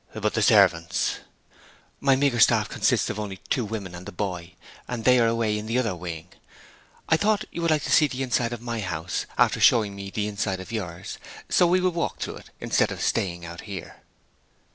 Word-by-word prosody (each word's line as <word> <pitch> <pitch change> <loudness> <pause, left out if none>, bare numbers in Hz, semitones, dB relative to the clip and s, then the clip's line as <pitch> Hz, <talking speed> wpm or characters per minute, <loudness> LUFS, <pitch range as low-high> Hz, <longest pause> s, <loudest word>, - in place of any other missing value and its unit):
'But - - -1
the - - 0
servants?' 85 0 +3 0.8
'My 135 -1 +4
meagre 135 -3 +1
staff 110 -2 +5
consists - - +1
of - - -6
only 100 -2 -5
two 125 - +2
women 105 -4 -5
and 90 +1 -9
the - - -6
boy; 90 -2 -5 0.3
and 120 -2 -4
they 125 +1 +5
are 115 - +4
away 115 -2 +1
in 105 - -7
the 115 +2 0
other 115 -7 0
wing. 85 -2 -7 0.8
I 160 - +4
thought 215 +3 +1
you 170 - -5
would 170 - +1
like 155 -2 +2
to - - -3
see 150 - +6
the 135 -1 -4
inside 120 -2 0
of 120 -1 -6
my 120 -1 -3
house, 85 -3 -3
after - - +3
showing 105 -4 +4
me 100 0 -7
the 105 +1 -2
inside 95 -2 -2
of 95 +4 -9
yours. 90 -7 -5 0.3
So 175 - +4
we 180 +2 +3
will 185 0 +2
walk 170 0 -2
through - - -4
it - - -14
instead - - +1
of - - -6
staying 85 -2 -1
out 85 0 -8
here.' 100 -5 -8
110 Hz, 210 wpm, -25 LUFS, 95-125 Hz, 0.8 s, see